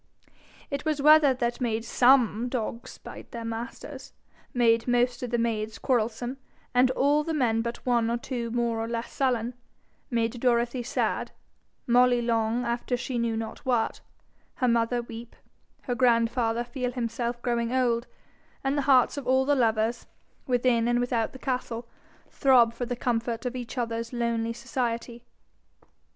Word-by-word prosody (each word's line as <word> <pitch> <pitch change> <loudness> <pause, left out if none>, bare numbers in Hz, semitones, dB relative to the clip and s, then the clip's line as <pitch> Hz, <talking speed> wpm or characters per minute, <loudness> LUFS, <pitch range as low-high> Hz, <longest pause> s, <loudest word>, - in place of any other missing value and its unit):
It 280 - -3
was 310 -2 -1
weather 300 0 +7
that 240 0 -2
made 225 -2 -1
SOME 245 -2 +4
dogs 235 -1 -4
bite - - -11
their 230 -1 -6
masters, 230 +2 -7 0.4
made 230 -1 +3
most 245 0 +2
of 250 - -3
the 240 - 0
maids 220 -2 -1
quarrelsome, 240 +1 -1 0.4
and 250 +1 +5
all 285 +3 +2
the 325 0 -2
men 230 -5 +2
but 235 +1 -5
one 235 -2 +2
or 235 - 0
two 240 -1 -4
more 235 -1 0
or 225 - -2
less 230 0 -4
sullen, 250 -3 0 0.6
made 235 0 -1
Dorothy 240 0 +1
sad, 240 - -1 0.6
Molly 245 0 +4
long 230 0 0
after 240 +1 -1
she 245 0 -3
knew 230 -1 0
not 225 0 -5
what, 240 -4 0 0.5
her 255 - 0
mother 235 +1 +1
weep, 230 0 -10 0.5
her 245 - -2
grandfather 235 -1 +2
feel 250 0 -4
himself 235 0 -2
growing 235 -1 0
old, 245 -2 +1 0.6
and 270 +1 0
the 290 - +1
hearts 255 +1 +5
of 275 -3 -5
all 260 +1 +3
the 290 - +3
lovers, 230 -2 +1 0.4
within 245 -2 +2
and 240 0 +2
without 245 -2 0
the - - -10
castle, 245 -2 -3 0.4
throb 245 -4 +4
for 240 +1 -4
the 245 - -2
comfort 235 -1 -2
of 250 0 -2
each 245 +1 -6
other's 230 -1 -2
lonely 230 -1 -1
society. 240 -1 -3
240 Hz, 155 wpm, -27 LUFS, 230-250 Hz, 0.6 s, weather